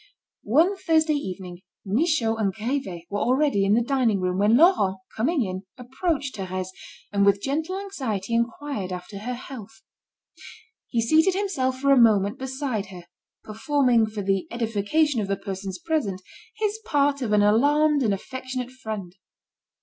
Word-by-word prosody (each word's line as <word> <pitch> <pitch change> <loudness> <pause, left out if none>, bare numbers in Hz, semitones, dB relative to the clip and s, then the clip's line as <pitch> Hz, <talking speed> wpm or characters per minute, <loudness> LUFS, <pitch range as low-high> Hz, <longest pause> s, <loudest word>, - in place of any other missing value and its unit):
One 330 - +4
Thursday 320 -3 +2
evening, 185 -9 -5 0.3
Michaud 230 - +1
and 205 -3 +1
Grivet 220 -4 -3
were 205 - -1
already 255 -4 +2
in 200 +2 +4
the 235 - +2
dining 240 -6 +1
room, 185 0 -1
when 210 +3 +4
Laurent 255 - +4 0.2
coming 260 +3 +1
in, 185 0 -4 0.2
approached 275 +3 -2
Thérèse, 185 -1 -4 0.4
and 200 0 +3
with 200 0 +4
gentle 315 - -2
anxiety 250 - -4
inquired 235 -3 -2
after 180 +3 -7
her 245 +4 -4
health. 225 -4 -10 1.0
He 230 -2 0
seated 320 +9 +4
himself 270 -11 -1
for 275 +1 +2
a 270 -3 +6
moment 205 -3 +3
beside 260 -5 -3
her, 180 -2 -10 0.4
performing 235 +1 +2
for 215 -1 -5
the 195 -1 0
edification 235 +4 0
of 200 - -3
the 195 0 -1
persons 195 -1 -5
present, 280 - -2 0.4
his 430 0 -1
part 285 -7 +1
of 235 -4 -2
an 210 -1 +4
alarmed 290 +7 +3
and 225 -5 +2
affectionate 255 +4 -5
friend. 215 -8 -7
235 Hz, 150 wpm, -24 LUFS, 200-285 Hz, 1.0 s, a